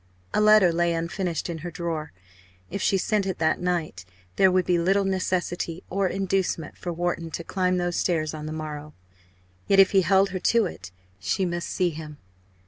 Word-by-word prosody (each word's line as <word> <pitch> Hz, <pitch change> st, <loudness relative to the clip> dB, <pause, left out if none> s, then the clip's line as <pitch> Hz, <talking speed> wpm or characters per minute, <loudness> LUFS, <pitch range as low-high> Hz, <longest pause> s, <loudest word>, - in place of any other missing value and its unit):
A -, -, +2 dB
letter 210 Hz, -5 st, +6 dB
lay 170 Hz, 0 st, +1 dB
unfinished 170 Hz, 0 st, -2 dB
in 170 Hz, -2 st, -5 dB
her 175 Hz, +3 st, -5 dB
drawer 165 Hz, -2 st, -4 dB, 0.6 s
if 200 Hz, +2 st, -3 dB
she 195 Hz, -, +2 dB
sent 200 Hz, +1 st, 0 dB
it 190 Hz, -, -2 dB
that 160 Hz, -1 st, +1 dB
night, 170 Hz, -, -2 dB, 0.3 s
there 190 Hz, -1 st, +5 dB
would 185 Hz, -1 st, +2 dB
be 175 Hz, -1 st, +2 dB
little 195 Hz, +3 st, +2 dB
necessity 180 Hz, -2 st, -2 dB
or 195 Hz, +1 st, +1 dB
inducement 190 Hz, -4 st, -1 dB
for 175 Hz, -, -5 dB
Wharton 170 Hz, -1 st, -2 dB
to 170 Hz, -, -5 dB
climb 185 Hz, +1 st, 0 dB
those 175 Hz, -1 st, -1 dB
stairs 160 Hz, -4 st, 0 dB
on 155 Hz, -1 st, -6 dB
the -, -, -4 dB
morrow. 150 Hz, -1 st, -6 dB, 0.7 s
Yet, 195 Hz, -, +4 dB
if 195 Hz, -, +7 dB
he 195 Hz, -, +5 dB
held 190 Hz, +2 st, +3 dB
her 185 Hz, -, -3 dB
to 230 Hz, +3 st, +3 dB
it, 90 Hz, -, -7 dB, 0.3 s
she 185 Hz, -, 0 dB
must 175 Hz, -1 st, -3 dB
see 180 Hz, -3 st, +1 dB
him. 150 Hz, -1 st, -8 dB
175 Hz, 190 wpm, -25 LUFS, 165-190 Hz, 0.7 s, if